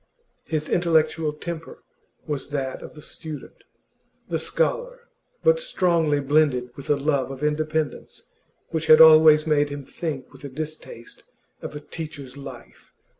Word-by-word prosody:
His 155 Hz, -6 st, -2 dB
intellectual 160 Hz, -2 st, +2 dB
temper 165 Hz, +2 st, -8 dB, 0.4 s
was 145 Hz, -3 st, -4 dB
that 135 Hz, -2 st, -3 dB
of -, -, -11 dB
the 150 Hz, -, -11 dB
student, 155 Hz, -3 st, -9 dB, 0.7 s
the -, -, 0 dB
scholar, -, -, -1 dB, 0.4 s
but 485 Hz, 0 st, +4 dB
strongly 170 Hz, -, +1 dB
blended 140 Hz, -3 st, +2 dB
with 140 Hz, -, -9 dB
a 145 Hz, -, +4 dB
love 140 Hz, -2 st, 0 dB
of 135 Hz, +1 st, -7 dB
independence 155 Hz, -1 st, -2 dB, 0.4 s
which 160 Hz, -1 st, -3 dB
had 155 Hz, 0 st, +8 dB
always 155 Hz, -1 st, +8 dB
made 145 Hz, -2 st, +2 dB
him 145 Hz, -1 st, -7 dB
think 155 Hz, -5 st, -5 dB
with 140 Hz, -2 st, -10 dB
distaste 155 Hz, -6 st, -7 dB, 0.4 s
of -, -, -7 dB
a -, -, -4 dB
teacher's 145 Hz, -4 st, -8 dB
life. 135 Hz, -4 st, -12 dB
155 Hz, 135 wpm, -24 LUFS, 140-160 Hz, 0.7 s, had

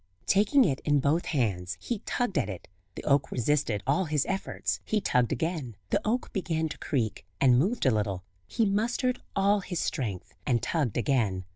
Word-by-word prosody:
Taking 215 Hz, +8 st, +4 dB
it 135 Hz, -2 st, 0 dB
in 145 Hz, -1 st, +2 dB
both 145 Hz, +5 st, +1 dB
hands 100 Hz, -, -1 dB
he 235 Hz, -4 st, -3 dB
tugged 245 Hz, -6 st, -1 dB
at 100 Hz, -, -1 dB
it; 95 Hz, -3 st, -7 dB, 0.3 s
the -, -, -7 dB
oak 140 Hz, -1 st, +2 dB
resisted 120 Hz, -4 st, 0 dB
all 145 Hz, +8 st, +2 dB
his 150 Hz, -3 st, +1 dB
efforts; 190 Hz, 0 st, -2 dB
he 215 Hz, -, 0 dB
tugged 125 Hz, -, +1 dB
again, 160 Hz, -, -2 dB, 0.2 s
the -, -, +2 dB
oak 240 Hz, +4 st, -1 dB
began 160 Hz, -5 st, -1 dB
to -, -, -7 dB
creak, 115 Hz, -8 st, -1 dB, 0.2 s
and 125 Hz, -2 st, +5 dB
moved 200 Hz, -, +1 dB
a 130 Hz, -, +5 dB
little; 100 Hz, -4 st, -1 dB, 0.2 s
he 225 Hz, -, +1 dB
mustered 240 Hz, +5 st, 0 dB
all 200 Hz, +1 st, +3 dB
his 180 Hz, -3 st, -4 dB
strength, 110 Hz, -, -3 dB
and 120 Hz, -2 st, +1 dB
tugged 145 Hz, -, 0 dB
again. 110 Hz, -7 st, +1 dB
145 Hz, 180 wpm, -28 LUFS, 120-195 Hz, 0.3 s, and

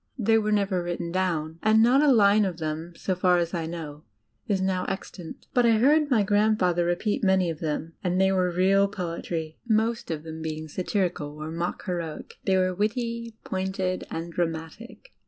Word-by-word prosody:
They 225 Hz, -1 st, +3 dB
were 215 Hz, 0 st, -1 dB
never 200 Hz, -3 st, +1 dB
written 175 Hz, -1 st, -4 dB
down, 165 Hz, -3 st, -1 dB
and 220 Hz, +1 st, +5 dB
not 255 Hz, +4 st, +5 dB
a 295 Hz, -2 st, +5 dB
line 210 Hz, -3 st, +5 dB
of 185 Hz, -4 st, -2 dB
them, 160 Hz, +1 st, -4 dB
so 190 Hz, -, -2 dB
far 180 Hz, 0 st, +3 dB
as 170 Hz, 0 st, -1 dB
I 165 Hz, -2 st, -2 dB
know, 155 Hz, -3 st, -7 dB, 0.4 s
is 200 Hz, -2 st, +1 dB
now 185 Hz, -1 st, 0 dB
extant. 180 Hz, -3 st, -7 dB
But 245 Hz, -, +4 dB
I 230 Hz, -, +5 dB
heard 290 Hz, +7 st, +4 dB
my 230 Hz, -6 st, +3 dB
grandfather 205 Hz, -4 st, +2 dB
repeat 175 Hz, +6 st, -1 dB
many 190 Hz, -3 st, +3 dB
of 155 Hz, -, -8 dB
them, 160 Hz, +1 st, -3 dB
and 180 Hz, 0 st, 0 dB
they 190 Hz, 0 st, +4 dB
were 185 Hz, -1 st, +2 dB
real 190 Hz, +3 st, +3 dB
poet 180 Hz, -4 st, -5 dB
ry, 160 Hz, -2 st, -3 dB
most 225 Hz, +1 st, +1 dB
of 155 Hz, -2 st, -3 dB
them 160 Hz, 0 st, -7 dB
being 155 Hz, 0 st, -4 dB
satirical 175 Hz, -3 st, -2 dB
or 155 Hz, +1 st, -6 dB
mock 170 Hz, +2 st, -3 dB
heroic. 170 Hz, -5 st, -5 dB
They 190 Hz, -1 st, +3 dB
were 185 Hz, 0 st, +2 dB
witty, 230 Hz, +3 st, -2 dB
pointed, 190 Hz, -1 st, -2 dB
and 165 Hz, +1 st, -5 dB
dramatic. 170 Hz, -, -5 dB
185 Hz, 190 wpm, -26 LUFS, 165-210 Hz, 0.4 s, and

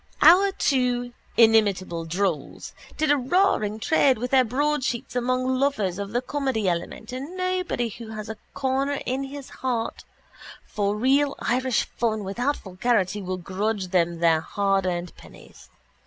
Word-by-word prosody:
Our 390 Hz, +4 st, +7 dB
two 245 Hz, -6 st, 0 dB, 0.2 s
inimitable 200 Hz, -7 st, +3 dB
drolls 170 Hz, -3 st, -2 dB, 0.2 s
did 310 Hz, -1 st, +2 dB
a 290 Hz, -, +4 dB
roaring 260 Hz, -, +1 dB
trade 270 Hz, +1 st, +3 dB
with 245 Hz, +3 st, -4 dB
their 265 Hz, -1 st, +6 dB
broadsheets 260 Hz, -1 st, -1 dB
among 255 Hz, +1 st, 0 dB
lovers 210 Hz, -10 st, 0 dB
of 200 Hz, -1 st, -4 dB
the 245 Hz, +2 st, -1 dB
comedy 260 Hz, -6 st, -1 dB
element 175 Hz, +6 st, -3 dB
and 275 Hz, +8 st, -6 dB
nobody 365 Hz, -9 st, -1 dB
who 230 Hz, +1 st, -9 dB
has 215 Hz, -1 st, -7 dB
a 220 Hz, 0 st, -6 dB, 0.2 s
corner 275 Hz, +1 st, 0 dB
in 265 Hz, +2 st, -2 dB
his 275 Hz, 0 st, -9 dB
heart 245 Hz, -3 st, -2 dB, 0.6 s
for 205 Hz, -1 st, -1 dB
real 275 Hz, +5 st, +2 dB
Irish 255 Hz, 0 st, +1 dB
fun 220 Hz, -3 st, -2 dB
without 245 Hz, +9 st, -1 dB
vulgarity 200 Hz, +1 st, -1 dB
will 185 Hz, -1 st, -3 dB
grudge 195 Hz, +2 st, -2 dB
them 175 Hz, -2 st, +1 dB
their 165 Hz, -2 st, +4 dB
hardearned 185 Hz, -3 st, -1 dB
pennies. -, -, -16 dB
235 Hz, 140 wpm, -25 LUFS, 200-270 Hz, 0.6 s, Our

